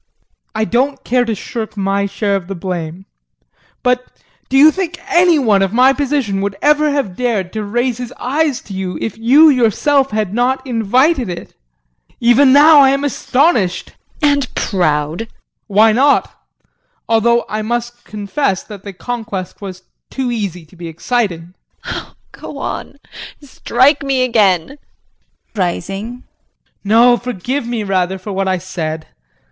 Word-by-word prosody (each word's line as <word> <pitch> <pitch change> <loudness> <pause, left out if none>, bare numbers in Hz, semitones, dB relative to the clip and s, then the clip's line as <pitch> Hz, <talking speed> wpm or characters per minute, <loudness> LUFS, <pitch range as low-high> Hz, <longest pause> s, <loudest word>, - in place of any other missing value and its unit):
I 220 0 0
don't 265 +4 0
care 250 0 +1
to 225 -2 -2
shirk 220 +1 -6
my 200 0 0
share 200 0 -1
of 185 -3 -4
the 195 - -5
blame, 175 0 -5 0.8
but 250 0 +2 0.5
do 270 - +2
you 300 +3 +8
think 360 0 -4
any 350 -3 +4
one 215 -8 +2
of 195 +1 0
my 255 +3 +5
position 270 -8 -1
would 200 0 -2
ever 300 +1 +3
have 275 -11 -2
dared 215 -7 -2
to 215 -1 -3
raise 240 +3 -1
his 245 -1 -6
eyes 285 +1 -1
to 200 - -11
you 190 -1 -4
if 225 - -4
you 260 +8 +5
yourself 270 +2 +2
had 210 -3 -2
not 250 +4 0
invited 250 - +1
it? 175 - -7 0.7
Even 240 +3 +5
now 295 +2 +7
I 270 -1 +6
am 275 +1 0
astonished 255 - 0 0.3
JULIE. 290 -1 +5
And 275 -3 -4
proud. 155 -5 0
JEAN. 225 - -5 0.4
Why 215 +2 +4
not? 275 +6 +2 0.7
Although 235 +1 +2
I 215 0 -3
must 240 +2 -4
confess 205 0 -2
that 205 -3 -11
the 200 0 -9
conquest 215 -3 -6
was 185 -2 -8 0.3
too 260 -2 -3
easy 195 -7 -4
to 155 - -21
be 170 -1 -8
exciting. 175 -1 -2 0.3
JULIE. - - -5 0.2
Go - - -10
on, - - -5 0.5
strike 280 +1 +1
me 270 -2 0
again 205 -9 +2
JEAN 280 - -13 0.8
[Rising]. 195 +5 -3 0.6
No, 235 +4 +5
forgive 245 +3 -4
me, 235 -2 -2
rather, 190 -1 0
for 190 +2 -8
what 195 0 -1
I 185 0 +1
said. 160 -3 -5
230 Hz, 155 wpm, -16 LUFS, 195-260 Hz, 0.8 s, you